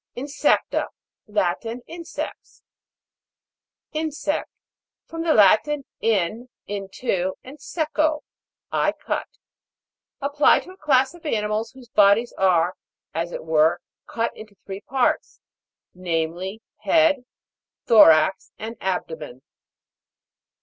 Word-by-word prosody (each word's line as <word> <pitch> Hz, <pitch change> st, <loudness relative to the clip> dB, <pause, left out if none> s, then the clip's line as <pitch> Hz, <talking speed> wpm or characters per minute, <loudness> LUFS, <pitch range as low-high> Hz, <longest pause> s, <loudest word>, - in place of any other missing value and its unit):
INSEC'TA. 280 Hz, +3 st, +1 dB, 0.4 s
Latin. 210 Hz, +4 st, -1 dB
Insects. 335 Hz, -1 st, -8 dB, 1.3 s
IN'SECT. 310 Hz, -1 st, -2 dB, 0.6 s
From 330 Hz, 0 st, -6 dB
the 330 Hz, -1 st, +2 dB
Latin, 260 Hz, +8 st, +4 dB
in, 225 Hz, +3 st, 0 dB, 0.2 s
into, 195 Hz, -1 st, -2 dB
and 275 Hz, +3 st, -12 dB
seco, 310 Hz, -1 st, 0 dB, 0.5 s
I -, -, +1 dB
cut. -, -, -3 dB, 0.9 s
Applied 285 Hz, +1 st, +3 dB
to 370 Hz, -, -12 dB
a 375 Hz, -, -15 dB
class 270 Hz, -3 st, +2 dB
of 345 Hz, -, -15 dB
animals, 220 Hz, -4 st, -1 dB
whose 260 Hz, -2 st, -14 dB
bodies 210 Hz, +3 st, +4 dB
are, 180 Hz, -2 st, +3 dB, 0.4 s
as 170 Hz, +2 st, -2 dB
it -, -, -6 dB
were, 160 Hz, 0 st, +3 dB, 0.3 s
cut 230 Hz, 0 st, -2 dB
into 215 Hz, -1 st, -12 dB
three 195 Hz, 0 st, -6 dB
parts; 255 Hz, +3 st, 0 dB, 0.5 s
name 165 Hz, -3 st, -1 dB
ly, 190 Hz, +5 st, -6 dB, 0.2 s
head, 315 Hz, -5 st, +3 dB, 0.6 s
thorax, 190 Hz, -5 st, +5 dB
and 225 Hz, +1 st, -7 dB
abdomen. 160 Hz, -8 st, -4 dB
225 Hz, 100 wpm, -23 LUFS, 190-290 Hz, 1.3 s, thorax